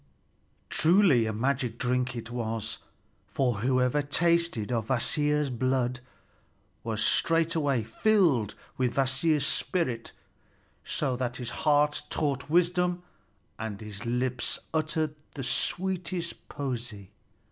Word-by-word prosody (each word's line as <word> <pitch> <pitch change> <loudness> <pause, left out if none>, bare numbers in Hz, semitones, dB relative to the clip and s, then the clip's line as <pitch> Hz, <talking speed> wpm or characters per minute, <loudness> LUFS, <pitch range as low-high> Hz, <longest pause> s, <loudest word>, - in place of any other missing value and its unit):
Truly, 165 - +4
a - - 0
magic 125 +1 -1
drink 125 0 0
it 115 0 -6
was; 115 -2 -3 0.5
for 125 -6 0
whoever 125 +4 +2
tasted 165 -5 +1
of 115 -3 -1
Kvasir's 145 +3 +2
blood 125 0 0 0.8
was 110 -1 -2
straightway 160 -6 +2
filled 140 - +2 0.2
with 125 -2 +1
Kvasir's 140 +3 +2
spirit, 130 -8 0 0.7
so 130 - -1
that 125 -1 -2
his 125 -2 -5
heart 150 -1 +2
taught 140 -3 -1
wisdom 175 +1 +2 0.6
and 110 -3 -4
his 105 -2 -8
lips 125 +1 -1 0.2
uttered 155 -1 0 0.2
the 135 - -4
sweetest 180 +3 -2
poesy. 120 -8 -5
130 Hz, 105 wpm, -28 LUFS, 120-160 Hz, 0.8 s, Truly